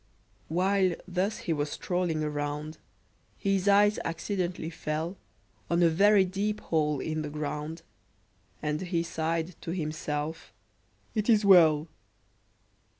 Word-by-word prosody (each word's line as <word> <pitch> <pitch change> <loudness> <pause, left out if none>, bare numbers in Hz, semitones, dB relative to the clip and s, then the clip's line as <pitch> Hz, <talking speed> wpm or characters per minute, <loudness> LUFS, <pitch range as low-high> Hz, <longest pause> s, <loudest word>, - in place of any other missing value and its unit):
While 185 +1 +2
thus 190 +4 -1
he 170 - +1
was 145 -1 -1
strolling 175 -2 -1
around, 150 +1 -3 0.6
His 195 -1 0
eye 205 +1 +6
accidentally 175 -1 -3
fell 160 +2 -3 0.5
On 170 +1 +3
a 170 - +6
very 195 +4 +5
deep 205 +3 -2
hole 150 -3 0
in 155 +2 -2
the 150 - -4
ground, 150 +2 -4 0.8
And 150 0 -1
he 170 -2 -1
sighed 165 +1 -2
to - - -7
himself, 155 -2 -3 0.6
"It 215 0 -1
is 215 -2 +5
well!" 160 -5 +6
165 Hz, 120 wpm, -29 LUFS, 155-190 Hz, 0.8 s, eye